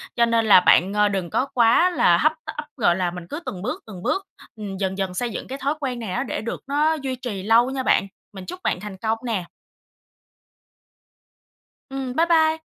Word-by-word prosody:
Cho 235 Hz, -, +4 dB
nên 230 Hz, -1 st, +1 dB
là 200 Hz, -3 st, +8 dB
bạn, 185 Hz, +2 st, +4 dB
ờ, 210 Hz, 0 st, +3 dB
đừng 190 Hz, -4 st, -2 dB
có 260 Hz, -, 0 dB
quá 245 Hz, +7 st, +4 dB
là 175 Hz, -, +4 dB
hấp 310 Hz, -, +3 dB
tấp, 300 Hz, -, -6 dB
gọi 175 Hz, -8 st, +3 dB
là, 180 Hz, -2 st, -1 dB
mình 180 Hz, -1 st, -8 dB
cứ 295 Hz, -, -4 dB
từng 180 Hz, -2 st, -5 dB
bước, 250 Hz, +5 st, -4 dB
từng 185 Hz, -4 st, -9 dB
bước, 390 Hz, 0 st, -1 dB, 0.3 s
ừm, 205 Hz, -3 st, -6 dB
dần 190 Hz, 0 st, -2 dB
dần 190 Hz, -2 st, -2 dB
xây 240 Hz, +6 st, -2 dB
dựng -, -, -6 dB
cái 270 Hz, +2 st, -5 dB
thói 280 Hz, +2 st, -1 dB
quen 255 Hz, -4 st, -3 dB
này 215 Hz, -5 st, -5 dB
á, 245 Hz, +7 st, -1 dB
để -, -, -4 dB
được 230 Hz, -, -5 dB
nó 300 Hz, +3 st, +2 dB
duy 270 Hz, -4 st, -3 dB
trì 240 Hz, -7 st, -5 dB
lâu 230 Hz, +4 st, +4 dB
nha 265 Hz, -1 st, -3 dB
bạn. 195 Hz, -, +2 dB, 0.3 s
Mình 190 Hz, -2 st, -9 dB
chúc 365 Hz, -, -7 dB
bạn -, -, 0 dB
thành 200 Hz, -1 st, -8 dB
công 220 Hz, +2 st, -1 dB
nè. 210 Hz, -7 st, -2 dB, 2.4 s
Ừm, 270 Hz, -2 st, -4 dB
bye 330 Hz, -, +3 dB
bye. 320 Hz, -1 st, +3 dB
230 Hz, 215 wpm, -23 LUFS, 195-270 Hz, 2.4 s, là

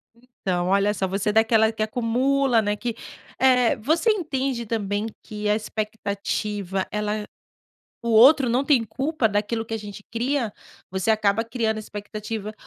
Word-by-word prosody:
Então, 195 Hz, -8 st, -3 dB
olha 200 Hz, +2 st, +3 dB
só, 190 Hz, -1 st, -1 dB
você 195 Hz, +2 st, -1 dB
é 210 Hz, -, 0 dB
daquela 220 Hz, 0 st, +4 dB
que 220 Hz, -1 st, -2 dB
acumula, 245 Hz, +2 st, +2 dB
né, 205 Hz, 0 st, 0 dB
que, 230 Hz, +2 st, -4 dB, 0.4 s
eh, 250 Hz, -1 st, +4 dB
você 315 Hz, -, +1 dB
entende 270 Hz, -, -2 dB
também 205 Hz, -1 st, -2 dB, 0.2 s
que 210 Hz, -2 st, -5 dB
a 210 Hz, -, +4 dB
expectativa, 205 Hz, -2 st, -3 dB
ela 210 Hz, 0 st, -2 dB, 0.8 s
o 235 Hz, -, -2 dB
outro 255 Hz, +4 st, +7 dB
não 245 Hz, +3 st, +2 dB
tem 265 Hz, -6 st, +3 dB
culpa 265 Hz, +3 st, 0 dB
daquilo 215 Hz, +2 st, -1 dB
que 225 Hz, -, -5 dB
a -, -, 0 dB
gente 205 Hz, -1 st, -9 dB
cria? 240 Hz, -1 st, -1 dB, 0.4 s
Você 190 Hz, +2 st, 0 dB
acaba 215 Hz, 0 st, +2 dB
criando 225 Hz, -2 st, -1 dB
expectativa 210 Hz, 0 st, -6 dB
220 Hz, 150 wpm, -24 LUFS, 210-245 Hz, 0.8 s, outro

